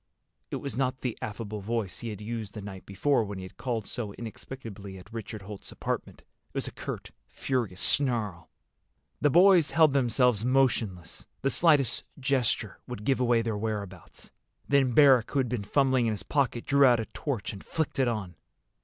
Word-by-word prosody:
It - - -3
was 140 - -5
not 130 0 -1
the 125 -3 -2
affable 105 0 -5
voice 105 -1 -3
he 120 - -5
had 105 -1 -7
used 110 -1 -5
the 105 - -5
night 95 -3 -9
before 115 +6 +2
when 100 -2 -6
he 95 - -6
had 95 - -10
called 120 -3 -2
so 105 -4 -5
inexplicably 110 -4 -8
at 90 - -14
Richard 110 -2 -6
Holt's 100 0 -9
apartment. - - -4
It - - -43
was - - -2
a - - -5
curt, - - -6 0.2
furious 120 -9 -2
snarl. 115 -10 +1 0.7
The 145 - +3
boys 175 0 +6
held 155 0 +4
themselves 125 -4 +3
motionless. 120 -9 0 0.2
The 135 - +2
slightest 145 -8 +4 0.2
gesture 130 -3 0
would 105 - -6
give 135 +3 +1
away 120 -2 +3
their 115 -2 -1
whereabouts. 100 -4 -5 0.4
Then 135 -4 +3
Barrack, 135 -6 +6
who - - -3
had 130 -3 +1
been 120 -4 -2
fumbling 130 +2 +2
in 110 - +1
his 105 - -6
pocket, 135 -5 0
drew 140 0 +4
out 125 -3 +6
a 115 - -2
torch 125 -7 -4
and 100 - -10
flicked 160 -3 -2
it 130 - +3
on. 105 -7 -2
120 Hz, 185 wpm, -28 LUFS, 105-135 Hz, 0.7 s, boys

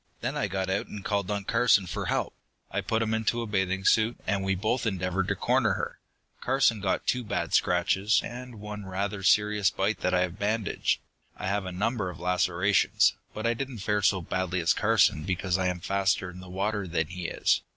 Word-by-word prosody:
"Then - - -2
I - - 0
got 95 0 -2
out 95 +1 -1
and 105 -2 -8
called 100 -3 -1
on 100 -1 -1
Carson 115 -2 +3
for 85 - -4
help. - - -1 0.4
I - - -1
put 115 0 0
him 110 0 -1
into 110 +1 0
a - - -4
bathing 95 -2 -1
suit, 115 +2 +3
and 100 0 0
we 95 0 +1
both 110 +5 0
endeavored 95 -2 -1
to - - 0
corner - - +2
her. - - -4 0.4
Carson 125 -5 +2
got 95 -1 0
two 125 0 +1
bad 105 - -3
scratches, 95 +4 +3
and 120 -1 -8
one 105 -1 -7
rather 95 +1 -3
serious 105 0 +3
bite 100 +3 -1
that 90 0 +1
I 90 - +3
have 90 +2 -2
bandaged. 105 0 0 0.4
I - - -5
have 100 -1 -1
a - - -4
number 100 +1 -1
of 90 - -9
lacerations, 90 +2 +2 0.2
but 110 - -4
I 115 - +3
didn't 130 0 -5
fare 105 +1 0
so 95 -1 +3
badly 95 +1 -1
as 85 +3 +3
Carson 105 -9 +3
because 95 +1 -1
I 90 - +1
am 90 -1 -2
faster 95 -1 0
in 90 - -11
the 90 0 -11
water 100 +1 -2
than 80 -1 0
he 90 +2 -5
is. - - +1
100 Hz, 210 wpm, -28 LUFS, 90-110 Hz, 0.4 s, Carson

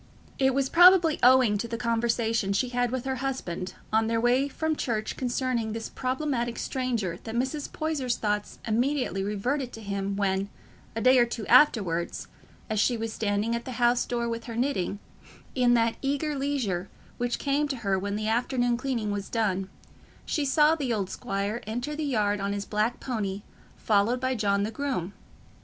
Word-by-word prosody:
It 265 -1 +3
was 275 -1 +2
probably 350 -1 +6
owing 250 -5 +5
to 235 - -3
the 230 0 -4
conversation 230 -3 0
she 245 +5 0
had 245 0 -3
had 245 -1 +1
with 255 -1 -3
her 265 -1 -1
husband 240 -9 -4 0.2
on 220 0 +3
their 230 0 +1
way 245 +4 +3
from 315 +2 -2
church 220 -6 -2
concerning 245 -3 -1
this 225 0 -5
problematic 255 -3 -2
stranger 240 -9 -2
that 225 - -6
Mrs. 265 +4 -2
Poyser's 290 -6 -1
thoughts 210 -1 -2
immediately 240 -3 0
reverted 240 +7 -2
to 225 - -8
him 200 -1 -3
when, 195 0 0 0.5
a 225 - -2
day 255 +1 +6
or 240 - +4
two 230 -2 -5
afterwards, 205 - +3 0.4
as 215 -2 -1
she 240 +3 +2
was 225 0 -4
standing 210 +2 0
at 235 - -4
the 255 - -5
house 240 0 +3
door 235 -1 -2
with 230 0 -4
her 230 - -6
knitting, 235 -7 -1 0.6
in 245 -1 +3
that 230 -1 +2
eager 285 +2 -1
leisure 260 -10 -2 0.3
which 240 0 0
came 285 +1 0
to 280 - -2
her 195 -1 +2
when 200 +1 -3
the 215 +1 -2
afternoon 245 +1 +1
cleaning 240 -5 -2
was 200 -1 -4
done, 195 -4 -1 0.6
she 295 - -1
saw 300 +3 +4
the 285 -6 -2
old 200 -4 -1
squire 200 +4 -3
enter 245 +7 -3
the 310 - -3
yard 210 -7 +1
on 200 +1 -1
his 200 0 -3
black 215 +3 -1
pony, 205 -5 -3 0.3
followed 220 +4 +2
by 260 0 0
John 200 -4 +1
the 215 - -2
groom. 225 -7 -3
235 Hz, 185 wpm, -27 LUFS, 210-260 Hz, 0.6 s, probably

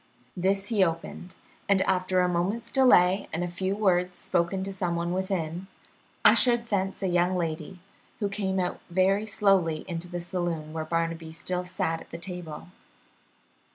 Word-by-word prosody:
This 195 +2 0
he 210 -5 +4
opened, 165 +1 -3 0.3
and 195 -1 +4
after 185 0 +1
a 180 - +3
moment's 195 +7 -1
delay 200 -8 +5
and 165 +2 -2
a - - -1
few 185 +3 -2
words 180 -3 +1
spoken 175 +3 0
to 195 - -4
some 180 -3 -2
one 170 0 -1
within, 185 -2 -2 0.6
ushered 240 -2 +5
thence 195 -3 -1
a - - +2
young 175 +1 +2
lady, 165 0 -3 0.4
who 205 - -1
came 195 -2 -1
out 180 -1 -2
very 190 +4 +2
slowly 195 -7 +2
into 170 -1 -4
the 175 0 -4
saloon 170 -3 -3
where 160 -1 -3
Barnaby 165 0 -2
still 180 +2 -3
sat 165 -2 -2
at - - -14
the - - -7
table. 175 -3 -7
180 Hz, 160 wpm, -27 LUFS, 170-195 Hz, 0.6 s, delay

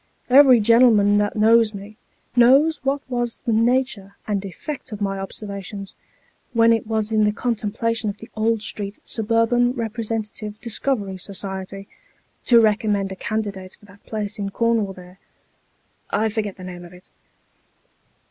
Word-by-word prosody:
Every 260 -2 +8
gen'lem'n 215 -2 +5
that 205 0 -1
knows 220 0 +4
me, 200 +2 -10 0.4
knows 270 +7 +5
what 275 +1 0
was 240 -2 -2
the 230 - +1
nature 230 -4 0
and 205 -2 -1
effect 255 - -7
of 210 - -6
my 195 -1 -2
observations, 200 0 -6 0.6
when 230 -1 +5
it 225 -1 -1
was 220 -1 -1
in 215 -1 +3
the 210 - +3
contemplation 230 0 -2
of 200 - -6
the 225 - -11
Old 220 0 0
Street 205 -1 -4
Suburban 230 +2 +1
Eepresentative 220 -2 -4
Discovery 220 -4 -2
Society, 195 0 -6 0.6
to 235 -2 +7
recommend 210 -2 +1
a - - -5
candidate 200 -3 -4
for - - -19
that 200 0 -19
place 210 -2 -4
in 200 -1 -2
Cornwall 225 -2 0
there 180 0 -14 0.9
I 220 +2 +1
forget 210 -2 -3
the 185 - -12
name 180 -1 -8
of 175 0 -13
it. 180 0 -17
215 Hz, 150 wpm, -22 LUFS, 200-230 Hz, 0.9 s, Every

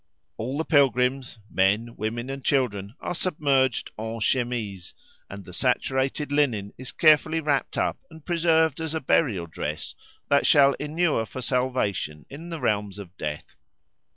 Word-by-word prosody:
All 130 +5 -3
the 160 - -1
pilgrims—men, 120 -6 +1
women, 120 +4 -3
and 135 -1 -6
children—are 120 - -1
submerged 140 -8 +1
en 110 +1 -4
chemise, 110 -6 -1 0.3
and 100 -1 -9
the 90 - -11
saturated 130 - 0
linen 120 -9 +1
is 130 0 -6
carefully 155 +1 +4
wrapped 145 -3 -1
up - - 0
and 160 -2 -14
preserved 160 -3 +2
as 160 -1 -3
a - - 0
burial 120 - +1
dress 75 -2 -5 0.3
that 140 - +3
shall 140 -2 +6
enure 150 -6 0
for 130 - -7
salvation 120 - -1
in 160 +5 -9
the 165 -2 -5
realms 105 -5 -1
of 95 -3 -10
death. 75 -5 -6
130 Hz, 140 wpm, -25 LUFS, 105-145 Hz, 0.3 s, shall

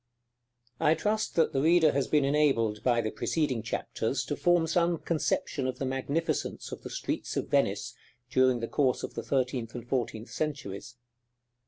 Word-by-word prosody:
I 155 - +4
trust 215 +3 -1
that 165 -2 +3
the 135 - +1
reader 160 0 +5
has 140 -1 0
been 150 -2 +3
enabled, 135 -7 +2
by 120 -2 +2
the 110 -1 -2
preceding 130 +2 -1
chapters, 115 +3 -2
to 145 - -2
form 175 0 +3
some 170 +1 +2
conception 150 -4 -1
of 130 - -3
the 135 - -2
magnificence 135 +5 -2
of - - -7
the - - -7
streets - - -3
of - - -2
Venice - - +1 0.3
during 130 -1 +3
the 115 - -2
course 130 -1 +1
of - - -5
the - - -4
thirteenth 125 -3 -1
and 120 -1 -7
fourteenth 120 -3 -2
centuries. 125 -7 -4
135 Hz, 170 wpm, -29 LUFS, 120-155 Hz, 0.3 s, reader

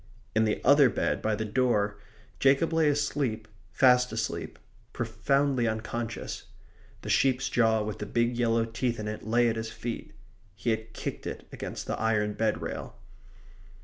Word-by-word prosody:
In 110 0 +3
the 105 - 0
other 140 -1 +7
bed - - -1
by 110 0 +1
the 110 - -3
door 105 -3 +1 0.4
Jacob 140 +5 +3
lay 160 -2 +4
asleep, 140 -6 -1 0.2
fast 125 -1 +4
asleep, 110 0 -3 0.4
profoundly 125 +2 +1
unconscious. 110 +1 -4 0.6
The - - -5
sheep's 135 -1 +2
jaw 110 -2 +3
with 105 0 -5
the 105 - -4
big 120 +3 +1
yellow 115 -1 +2
teeth 115 +1 -2
in 105 - -4
it 105 +1 -5
lay 120 +2 +3
at 115 -1 0
his 110 0 -3
feet. 115 -3 -6 0.4
He 105 +4 -1
had 110 0 -3
kicked - - -5
it - - -6
against - - -6
the - - -3
iron 110 -2 +1
bed 110 0 0
rail. - - -5
115 Hz, 160 wpm, -28 LUFS, 110-125 Hz, 0.6 s, other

